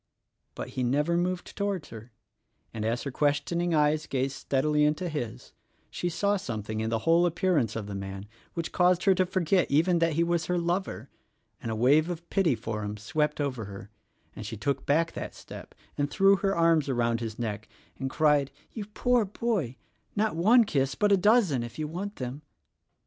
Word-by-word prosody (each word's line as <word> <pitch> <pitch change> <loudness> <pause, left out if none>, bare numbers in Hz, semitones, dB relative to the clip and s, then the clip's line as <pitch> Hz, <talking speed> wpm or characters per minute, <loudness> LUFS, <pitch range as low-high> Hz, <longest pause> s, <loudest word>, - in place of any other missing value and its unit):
But - - -6
he 130 - -4
never 145 +7 +1
moved 180 +1 -2
toward 200 -6 -2
her; 115 +2 -11 0.6
and, 110 - -4
as 115 +2 -1
her 140 - -4
question 150 +5 0
ing 175 -1 +1
eyes 150 +1 +2
gazed 135 0 -1
steadily 150 +2 +1
into 150 +4 +1
his, 145 -9 -5 0.4
she 175 - -2
saw 200 +4 +1
something 110 - -4
in 110 0 -1
the 115 - +1
whole 170 +2 +5
appearance 165 - +1
of 115 -2 -3
the 100 - -6
man 95 0 -6 0.3
which 170 -2 -3
caused 180 0 +3
her 195 - +5
to 185 0 +1
forget 185 -1 +1
even 170 +4 +3
that 165 -1 +2
he 165 +3 +2
was 170 -1 0
her 180 - +1
lover, 175 +3 -2 0.5
and - - -4
a 110 - -2
wave 145 +8 +4
of 170 -1 -6
pity 175 -9 +3
for 110 -1 -4
him 105 +1 -4
swept 150 +6 -1
over 130 -6 -2
her, 100 +1 -10 0.4
and 110 - -7
she 110 - -6
took 135 +7 -2
back 165 +4 +2
that - - -6
step - - -11 0.2
and 145 0 +1
threw 195 +5 +5
her 195 0 0
arms 165 -3 +3
around 120 -2 +1
his 115 -2 -5
neck 110 -2 -4 0.3
and 135 - -2
cried, 150 -1 +3 0.2
"You 215 -3 -6
poor 245 +3 +1
boy 200 - -2 0.2
— 110 - -42
not 215 -3 +1
one 220 +9 +6
kiss, 135 -9 0
but 210 -1 +2
a - - +7
dozen 195 - +3
if 120 0 -7
you 155 -1 -2
want 195 +6 -5
them." 130 +3 -5
150 Hz, 200 wpm, -28 LUFS, 120-180 Hz, 0.6 s, a